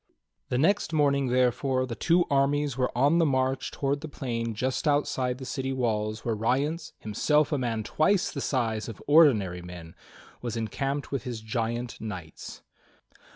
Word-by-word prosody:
The 125 - 0
next 165 +4 +2
morning, 140 -3 +2
therefore, 130 +1 +1
the 125 - -5
two 170 +8 +2
armies 140 0 +2
were 125 -1 +1
on 145 +6 +4
the - - +5
march 130 -1 0
towards 140 +1 -2
the 160 - -5
plain 115 -6 -3
just 130 +7 -1
outside 130 -3 +1
the 130 - -8
city 135 0 -3
walls 110 -4 -1
where 115 - +1
Rience, 140 +9 -1
himself 150 +9 +1
a 145 - +1
man 115 -3 -1
twice 175 - +1
the 140 - -5
size 115 -5 -1
of 110 - -8
ordinary 110 - +4
men, 85 -2 -10 0.5
was 120 -2 -4
encamped 135 +5 -3
with 140 -3 -1
his 120 -2 -5
giant 115 +1 -3
knights. 90 -7 -8
130 Hz, 160 wpm, -27 LUFS, 115-145 Hz, 0.5 s, the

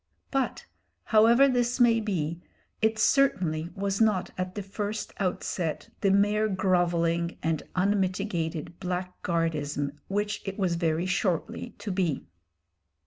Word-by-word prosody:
But, 270 -1 -1 0.4
however 235 +5 +6
this 245 -1 +1
may 235 -2 +5
be, 170 -6 -2 0.4
it 220 0 +2
certainly 180 - +2
was 195 +1 -1
not 210 -5 +2
at 185 0 -4
the 205 - -3
first 205 +2 -4
outset 180 -3 -2
the 200 - +3
mere 205 +2 +3
grovelling 175 -3 +1
and 160 -1 0
unmitigated 185 -4 -1
blackguardism 165 -5 -2 0.2
which 205 +1 -1
it 195 -1 -5
was 185 -4 +1
very 170 0 0
shortly 185 -2 -1
to 205 - -5
be. 180 -6 -1
185 Hz, 120 wpm, -28 LUFS, 170-210 Hz, 0.4 s, however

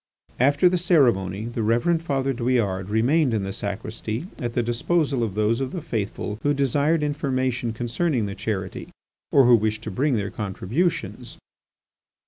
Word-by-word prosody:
After 145 +7 +4
the 180 0 +2
ceremony, 110 - +2
the 120 0 -3
Reverend 120 +10 +2
Father 135 -4 -1
Douillard 115 -7 0
remained 125 +5 +2
in 105 - -1
the 95 0 -4
sacristy 110 - -4
at 120 -2 -3
the 120 - +2
disposal 135 +3 0
of 110 -4 -2
those 110 +3 +1
of 130 - -3
the 180 - -4
faithful 105 -5 -3
who 145 0 +1
desired 145 +4 +1
information 130 -5 -1
concerning 120 +2 -1
the 100 - -4
charity, 95 -2 -4 0.4
or 135 -2 +6
who 120 0 +7
wished 110 0 -1
to - - -5
bring 140 0 +1
their 100 -2 -2
contributions. 110 - -2
120 Hz, 155 wpm, -24 LUFS, 110-140 Hz, 0.4 s, who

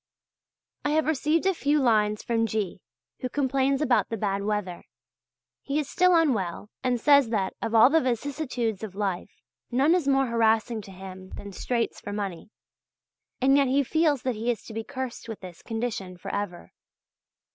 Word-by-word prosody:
I - - 0
have 315 0 +2
received 315 +3 +1
a 385 - +4
few 295 -2 +1
lines 215 -5 +2
from 230 -1 +1
G., 205 -5 -3 0.4
who 255 - -3
complains 275 +1 +1
about 245 -8 +2
the 225 - -3
bad 200 -1 -1
weather. 205 -4 -3 0.8
He 280 +1 -2
is 300 -3 0
still 365 +4 +4
unwell, 210 - +1
and 250 -2 +1
says 280 -1 +5
that 200 -4 0
of 230 0 -2
all 225 +4 +7
the 325 +1 +4
vicissitudes 250 -4 -2
of 210 -4 -7
life, 195 -3 -2 0.4
none 270 +6 +3
is 350 -6 +1
more 270 -1 +4
harassing 225 -1 +2
to 195 - -12
him 185 0 -10
than 200 - -8
straits 235 +4 -2
for 205 - -6
money. 200 -5 -4 0.9
And 270 +2 +5
yet 280 -1 +4
he 275 +2 +3
feels 300 -1 +1
that 255 - 0
he 225 +2 -3
is 235 -4 -1
to 225 - -10
be 225 +1 -3
cursed 260 -3 -6
with 220 - -6
this 180 -3 -10
condition 225 -6 -4
for - - -7
ever. 200 -4 -4
235 Hz, 180 wpm, -26 LUFS, 205-275 Hz, 0.9 s, all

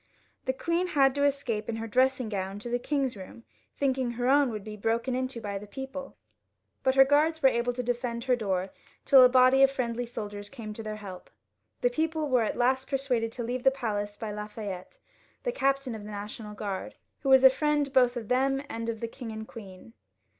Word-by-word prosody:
The 260 - +1
queen 335 +6 -1
had 275 -5 +3
to 285 +1 +1
escape 265 -7 -1
in 230 - -1
her 225 0 -4
dressing 255 +2 +2
gown 195 -2 -3
to 215 +4 -6
the 245 +1 0
king's 270 -2 -1
room, 195 +4 -11 0.3
thinking 265 -3 0
her 245 +1 -2
own 280 0 +4
would 215 -3 -5
be 215 0 -7
broken 230 +4 -1
into 255 -1 -2
by 200 -3 -4
the 210 - -11
people, 270 +4 -7 0.7
but 260 0 +2
her 270 0 +8
guards 310 +3 +2
were 265 - +8
able 235 0 0
to 250 +1 -3
defend 240 -1 -2
her 255 0 +3
door 195 -5 -2 0.3
until 265 -2 +8
a 250 - +8
body 255 +1 +5
of 270 - +7
friendly 245 -3 -2
soldiers 205 -4 -6
came 225 -6 -7
to 225 - -7
their 215 -1 -5
help. 195 -4 -9 0.5
The 245 - +2
people 315 +2 -1
were 250 -2 +3
at 220 - -1
last 260 +2 +1
persuaded 255 -5 0
to 240 - -4
leave 245 +2 -3
the - - +7
palace 205 -6 -3
by 220 -2 -5
Lafayette, 210 - -6 0.5
the - - 0
captain 275 - 0
of 215 -2 -7
the 210 - -8
National 210 +1 -7
Guard, 200 -2 -5 0.2
who 275 - -2
was 265 0 +7
a 265 - +10
Mend 295 -2 +1
both 250 -2 +4
of 225 -3 -5
them 270 +3 +1
and 230 0 -4
of 225 -1 -4
the 230 - -2
king 230 0 -8
and 220 0 -7
queen. 200 0 -12
245 Hz, 215 wpm, -28 LUFS, 215-270 Hz, 0.7 s, a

